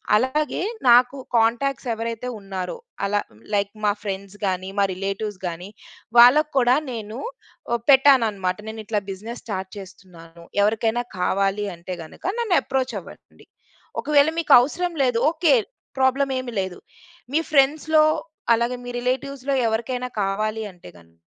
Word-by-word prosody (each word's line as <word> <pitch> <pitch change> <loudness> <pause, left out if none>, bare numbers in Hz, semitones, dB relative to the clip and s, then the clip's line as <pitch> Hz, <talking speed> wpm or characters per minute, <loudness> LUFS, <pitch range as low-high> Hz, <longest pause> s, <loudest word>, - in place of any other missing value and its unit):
అలాగే, 260 +6 0 0.3
నాకు 245 +3 +6 0.2
కాంటాక్ట్స్ 240 +3 +1
ఎవరైతే 230 +2 -4
ఉన్నారో 195 - -5 0.3
అలా, 205 +1 +1 0.3
లైక్ 200 0 +1
మా 205 - +4
ఫ్రెండ్స్ 200 0 -5
గాని, 185 0 -2
మా 200 - +4
రిలేటివ్స్ 195 +1 -4
గాని, 175 +3 -6 0.5
వాళ్ళకి 295 +6 +7
కూడా 250 0 +5 0.2
నేను 220 -1 -6 0.6
అహ్, 235 - 0
పెట్టానన్నమాట. 225 -9 +4
నేనిట్లా 220 -1 -3
బిజినెస్ 220 +5 -8
స్టార్ట్ 190 -3 -4
చేస్తున్నాను. 175 -3 -13 0.2
ఎవరికైనా 225 +3 +1 0.2
కావాలి 195 +3 +1
అంటే 175 +2 -7
గనుక 155 - -14
నన్ను 425 -7 +1
అప్రోచ్ 265 -1 -2
అవ్వండి. - - -16 0.6
ఒకవేళ 295 0 +4
మీకు 330 - +3
అవసరం 350 +7 -2
లేదు. 245 -3 +2
ఓకె, 325 -4 +3 0.4
ప్రాబ్లమ్ 265 +1 +2
ఏమి 255 -1 -6
లేదు. 190 -1 -6 0.5
మీ 320 - +3
ఫ్రెండ్స్‌లో, 305 +2 +4 0.5
అలాగే 240 +2 -1
మీ 245 - -6
రిలేటివ్స్‌లో 270 +2 -2
ఎవరికైనా 245 +3 -2
కావాలి 215 +3 -1
అంటే 175 - -14
గనుక 85 0 -24
225 Hz, 130 wpm, -23 LUFS, 195-265 Hz, 0.6 s, వాళ్ళకి